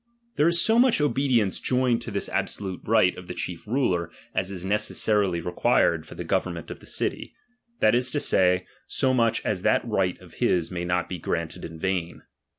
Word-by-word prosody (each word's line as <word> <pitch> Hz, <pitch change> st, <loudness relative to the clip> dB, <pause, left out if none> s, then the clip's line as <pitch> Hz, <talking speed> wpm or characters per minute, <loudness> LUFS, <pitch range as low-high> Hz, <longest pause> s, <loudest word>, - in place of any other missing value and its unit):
There 150 Hz, -, +3 dB
is 170 Hz, 0 st, +4 dB
so 225 Hz, +6 st, +4 dB
much 250 Hz, -6 st, +4 dB
obedience 130 Hz, -8 st, +1 dB
joined 125 Hz, -2 st, +1 dB
to -, -, -6 dB
this -, -, -3 dB
absolute 95 Hz, -3 st, -2 dB
right 105 Hz, -5 st, +3 dB
of 90 Hz, -, -10 dB
the 90 Hz, -, -6 dB
chief 90 Hz, +3 st, -5 dB
ruler, 95 Hz, -9 st, 0 dB, 0.2 s
as 95 Hz, 0 st, -1 dB
is 95 Hz, -2 st, -6 dB
neces 105 Hz, +2 st, 0 dB
sarily 100 Hz, -6 st, +1 dB
required 85 Hz, -2 st, +2 dB
for -, -, -11 dB
the -, -, -5 dB
government -, -, -2 dB
of -, -, -8 dB
the -, -, -15 dB
city, -, -, -2 dB, 0.5 s
that 110 Hz, -, +5 dB
is 125 Hz, +1 st, +2 dB
to 145 Hz, -, -1 dB
say, 90 Hz, -7 st, +2 dB, 0.2 s
so 130 Hz, -1 st, +1 dB
much 115 Hz, -3 st, +1 dB
as 100 Hz, -4 st, -1 dB
that -, -, +2 dB
right 95 Hz, -5 st, 0 dB
of -, -, -16 dB
his 85 Hz, -1 st, +1 dB
may 90 Hz, -1 st, -3 dB
not 90 Hz, 0 st, 0 dB
be 90 Hz, -, -5 dB
granted 85 Hz, +1 st, -3 dB
in 80 Hz, 0 st, -7 dB
vain. 90 Hz, -1 st, -3 dB
95 Hz, 200 wpm, -25 LUFS, 90-125 Hz, 0.5 s, that